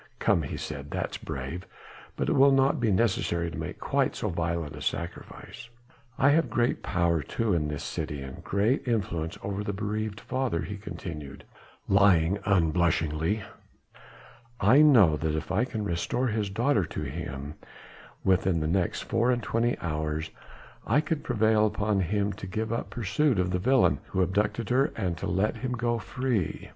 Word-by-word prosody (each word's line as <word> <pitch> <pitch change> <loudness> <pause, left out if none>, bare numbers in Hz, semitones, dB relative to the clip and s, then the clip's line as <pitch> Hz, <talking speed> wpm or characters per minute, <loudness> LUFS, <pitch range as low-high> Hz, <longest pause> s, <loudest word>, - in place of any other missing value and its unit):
"Come!" 85 - +2
he 70 - -5
said, 70 +1 -6
"that's - - -3
brave! 70 +7 -6 0.5
but - - -2
it - - +2
will 140 +1 +6
not 135 0 +3
be 115 -2 +1
necessary 95 -5 +1
to - - -6
make - - -5
quite - - 0
so - - -2
violent 85 -3 -2
a - - -9
sacrifice. 85 +6 -5 0.5
I 140 - +5
have 165 +3 +3
great 120 +1 +1
power 85 -3 +1
too 110 +6 -1
in 75 -3 +1
this 75 -1 -4
city 75 -3 -4
and 65 -1 -9
great 110 +8 +1
influence 95 -8 -1
over 100 +1 -3
the 100 - -3
bereaved 105 +1 -3
father," 130 -10 -2
he 100 +1 -5
continued, 85 -8 -7 0.4
lying 95 -2 +4
unblushingly, 85 0 +1 1.2
"I 120 +9 +6
know 110 - +6
that 80 0 -1
if 80 +3 -4
I 105 +6 +2
can 110 -4 -4
restore 105 +8 -1
his 110 -2 -1
daughter 115 +1 +2
to 75 - -5
him 70 0 -5 0.7
within 95 -2 +2
the 75 - -1
next 90 +1 0
four 115 +2 +1
and 120 -2 +1
twenty 115 +3 0
hours, 80 -1 -2 0.5
I 145 - +3
could 155 -1 -2
prevail 110 -2 +3
upon 105 -1 0
him 100 +2 0
to 95 - -8
give 110 +3 -2
up 115 - -3
pursuit 120 +4 +1
of 90 0 +1
the 90 - 0
villain 130 +7 +3
who 95 -1 +1
abducted 105 +4 -1
her, 135 +2 +4
and 90 -5 -1
to - - -3
let 95 +5 0
him 125 -1 -3
go 120 -1 0
free." 120 -3 -2
100 Hz, 170 wpm, -28 LUFS, 85-115 Hz, 1.2 s, will